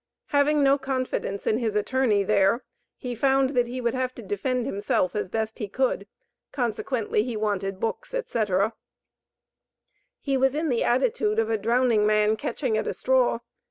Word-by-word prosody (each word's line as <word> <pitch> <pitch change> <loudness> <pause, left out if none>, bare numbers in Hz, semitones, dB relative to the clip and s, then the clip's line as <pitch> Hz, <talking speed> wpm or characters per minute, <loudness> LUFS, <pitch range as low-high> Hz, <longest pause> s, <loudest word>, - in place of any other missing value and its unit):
Having 290 +1 +3
no 275 +1 +4
confidence 255 -7 -3
in 220 - +1
his 220 -4 -1
attorney 210 -1 +2
there 200 +4 +2 0.3
he 250 -1 -5
found 270 +2 +2
that 245 -3 +1
he 250 +2 -5
would 235 -2 0
have 255 -1 -2
to - - -9
defend 255 - -1
himself 200 -5 0
as 205 -3 -2
best 220 +3 -3
he 210 - -3
could, 230 -2 -1 0.4
consequently 235 -3 -1
he 230 0 -3
wanted 195 -2 -2
books, 225 - -3
etc. 215 - 0 1.5
He 275 -2 0
was 265 +1 +2
in 315 +1 0
the 240 -3 +1
attitude 425 - +1
of 455 0 +1
a 445 - +2
drowning 235 -3 +2
man 215 0 +3
catching 260 -2 -2
at - - -3
a - - -2
straw. 255 -2 +2
245 Hz, 165 wpm, -25 LUFS, 215-265 Hz, 1.5 s, no